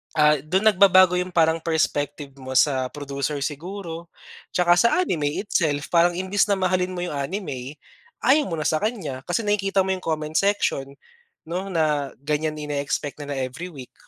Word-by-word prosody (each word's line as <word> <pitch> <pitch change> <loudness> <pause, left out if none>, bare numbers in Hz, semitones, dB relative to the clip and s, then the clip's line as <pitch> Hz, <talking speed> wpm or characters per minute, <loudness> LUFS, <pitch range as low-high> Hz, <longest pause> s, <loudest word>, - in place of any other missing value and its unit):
ah, 150 -1 +4
dun 185 +9 +1
nagbabago 185 -2 +6
yung 180 0 -4
parang 165 -1 +3
perspective 145 -3 -1
mo 130 0 -7
sa 130 -1 +3
producer 140 0 -3
siguro 170 +3 -6 0.5
tsaka 175 -1 +4
sa 235 - +5
anime 150 - -1
itself, 150 -8 0
parang 175 0 +4
imbes 190 +3 +1
na 200 - +3
mahalin 185 -1 0
mo 175 - -3
yung 160 - -5
anime, 140 -4 -4 0.5
ayaw 290 +2 +4
mo 165 - -2
na - - -1
sa 155 - +2
kaniya 200 - -3
kasi 175 +6 0
nakikita 200 -2 +1
mo 190 - 0
yung - - -7
comment 155 -1 -2
section 170 -8 +1 0.5
'no, 180 +4 -3
na 150 -5 0
ganiyan 155 +1 -1
ine-expect 145 0 -3
na 145 - -7
na - - -5
every 130 +7 -4
week. 135 -5 -11
160 Hz, 170 wpm, -23 LUFS, 145-185 Hz, 0.5 s, nagbabago